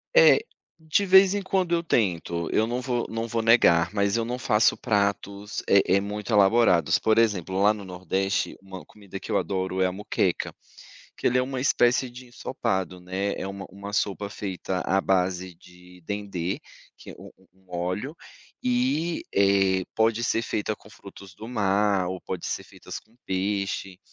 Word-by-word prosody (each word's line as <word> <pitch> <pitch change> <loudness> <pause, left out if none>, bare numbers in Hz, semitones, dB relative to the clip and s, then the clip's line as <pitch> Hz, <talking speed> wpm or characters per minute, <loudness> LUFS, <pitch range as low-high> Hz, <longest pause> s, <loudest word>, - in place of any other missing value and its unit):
É, - - +8 0.4
de 160 +5 +1
vez 190 +1 +7
em 205 - -1
quando, 185 -2 0
eu 170 0 +1
tento, 85 - 0
eu 110 - +2
não 120 +2 -2
vou 120 -2 -1
não 115 +1 -3
vou 115 0 -1
negar, 105 -6 +4
mas 100 +1 +1
eu 115 - 0
não 125 +2 -3
faço 110 -3 +3
pratos, 100 -2 -1
eh 100 0 +6
eh, 100 - +3
muito 105 +2 -4
elaborados, 100 -3 +4
por 110 0 +2
exemplo, 95 -4 +1
lá 105 +1 +5
no 105 -2 -9
nordeste, 95 +2 -2
uma 95 -1 -10
comida 100 -2 -10
que - - -8
eu - - +3
adoro 95 -1 -2
é - - +4
a 90 - 0
moqueca, 105 +2 -1 0.6
que - - 0
ele 125 - +2
é - - +4
uma 130 0 -3
espécie 125 -1 +3
de 125 +1 -12
ensopado, 95 -7 -3
né, 95 +3 -2
é - - -4
uma 95 0 -7
uma 100 +2 -9
sopa 100 0 -1
feita 95 -2 -4
à 95 +2 +2
base 95 -1 0
de 90 +1 -18
dendê, 100 -3 -3 0.4
que - - -11
é - - -12
um - - -11
um 95 - -26 0.2
um 90 - -8
óleo, 90 - -3 0.5
e, 245 -10 0
eh, 95 -1 +3
pode 115 +1 +2
ser 115 - +1
feita 110 -1 -2
com 105 - -18
frutos 100 -3 -13
do 110 - -9
mar 100 -4 +1
ou 95 0 -4
pode 90 -2 -6
ser - - -3
feitas - - -9
com 110 +2 -30
peixe, 95 0 -2
100 Hz, 180 wpm, -25 LUFS, 95-115 Hz, 0.6 s, É